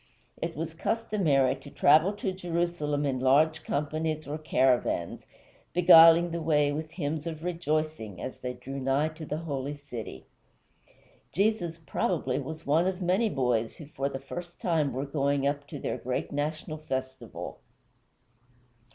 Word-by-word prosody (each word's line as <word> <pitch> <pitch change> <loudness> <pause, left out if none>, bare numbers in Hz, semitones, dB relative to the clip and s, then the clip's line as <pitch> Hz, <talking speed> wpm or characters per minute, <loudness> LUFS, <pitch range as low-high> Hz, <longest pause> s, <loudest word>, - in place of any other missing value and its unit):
It 165 0 -3
was 160 +1 -4
customary 165 - +1
to 135 +2 -12
travel 155 +8 +4
to 200 -2 -2
Jerusalem 170 -5 -1
in 135 -2 0
large 150 +5 +3
companies 155 +1 -2
or 150 +2 -4
caravans, 130 - +1 0.5
beguiling 165 0 +8
the 170 0 -3
way 150 -2 +3
with 155 +2 -4
hymns 155 -1 -3
of 160 -1 -5
rejoicing 155 - -2
as 130 - -6
they 125 0 -4
drew 135 +3 -7
nigh 135 +4 +1
to 155 0 -9
the 150 - -2
holy 145 -3 -4
city. 125 - -8 1.1
Jesus, 190 -5 0
probably, 155 -4 -1
was 155 +3 -7
one 160 +5 +3
of 190 -1 -2
many 190 +5 +2
boys 125 - 0
who 155 - -10
for 140 -1 -3
the 135 - -4
first 175 +5 -8
time 160 -5 +1
were 135 +3 -3
going 140 -1 0
up 145 0 -1
to 145 - -7
their - - -3
great 125 0 -3
national 155 +2 -3
festival. 130 -3 -5
155 Hz, 150 wpm, -28 LUFS, 140-165 Hz, 1.1 s, beguiling